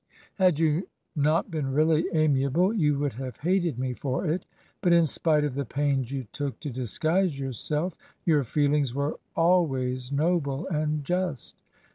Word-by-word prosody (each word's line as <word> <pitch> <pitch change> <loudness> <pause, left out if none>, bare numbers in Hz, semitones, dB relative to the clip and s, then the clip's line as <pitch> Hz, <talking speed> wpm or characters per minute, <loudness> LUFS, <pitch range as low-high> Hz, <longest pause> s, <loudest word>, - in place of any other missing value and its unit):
Had 180 -5 +4
you 160 +3 +1 0.3
not 155 +5 +1
been 150 -4 -2
really 155 +2 +3
amiable 155 - +2
you 150 -9 +2
would 145 -1 -1
have 130 +2 -6
hated 175 -4 0
me 130 0 -2
for 135 +5 -2
it, 170 +3 -1 0.3
but 175 -3 +4
in 170 -1 +5
spite 150 +4 +2
of 145 -3 -1
the 140 +2 -2
pains 135 -1 -1
you 135 -2 -3
took 140 -2 -4
to 145 - -4
disguise 155 - 0
yourself, 150 +6 -2 0.3
your 150 -4 +3
feelings 145 0 +1
were 140 +1 -2 0.2
always 135 -7 +1
noble 150 0 0
and 150 -2 -1
just. 180 -3 -2
150 Hz, 155 wpm, -27 LUFS, 135-165 Hz, 0.3 s, in